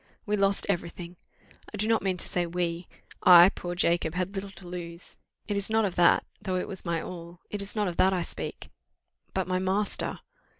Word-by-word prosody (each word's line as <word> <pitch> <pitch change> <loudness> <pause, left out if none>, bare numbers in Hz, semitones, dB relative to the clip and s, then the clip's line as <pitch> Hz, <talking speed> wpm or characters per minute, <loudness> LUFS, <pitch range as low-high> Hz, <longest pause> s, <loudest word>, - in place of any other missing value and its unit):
We 210 -1 +1
lost 200 -1 +2
every 175 -3 0
thing! 175 0 -9 0.6
I 210 - -6
do 210 +2 0
not 225 0 +3
mean 190 -2 0
to - - -5
say 175 -1 -1
we 170 0 -2 0.3
I, 175 0 +9
poor 175 -2 -5
Jacob, 170 -2 +1
had 185 +2 -2
little 195 0 -4
to 195 -2 -12
lose. 175 -1 -7 0.3
It 205 - -1
is 200 +1 -2
not 220 0 +3
of 190 - -1
that, 175 -1 +4 0.2
though 185 - -2
it 180 - -1
was 190 - -7
my 170 -2 -1
all, 170 0 -8
it 205 - -2
is 200 +2 -2
not 210 -2 +1
of 175 - -4
that 190 - +5
I 180 -2 0
speak - - -7 0.6
but 190 -1 0
my 185 0 0
master! 190 +3 -1
185 Hz, 215 wpm, -28 LUFS, 175-200 Hz, 0.6 s, I